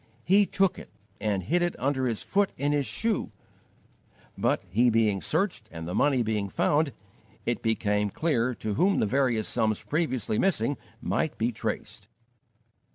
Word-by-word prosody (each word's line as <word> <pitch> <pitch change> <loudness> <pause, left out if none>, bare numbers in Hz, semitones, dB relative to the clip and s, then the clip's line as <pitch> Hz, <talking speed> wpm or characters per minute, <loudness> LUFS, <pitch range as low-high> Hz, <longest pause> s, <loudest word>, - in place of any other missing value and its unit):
He 200 +2 +4
took 195 -2 +1
it - - -11 0.3
and 100 -3 -1
hid 175 - +1
it 175 0 0
under 130 -1 0
his 115 -3 -2
foot 200 0 +1
in 145 +2 0
his 145 -2 +1
shoe, 225 -2 -1 1.0
but, - - 0
he 115 +7 +3
being 110 -4 +2
searched 155 - -1
and 80 0 -7
the 90 - -4
money 135 +1 +3
being 105 -3 -1
found, 145 +8 +2 0.5
it - - -1
became 105 -2 +1
clear 125 - 0
to 110 -2 -3
whom 190 - +3
the - - +2
various 120 -2 +1
sums 110 -1 0
previously 130 -9 -1
missing 145 - +1 0.3
might - - -1
be 115 +2 +1
traced. 110 - -5
125 Hz, 160 wpm, -27 LUFS, 110-155 Hz, 1.0 s, He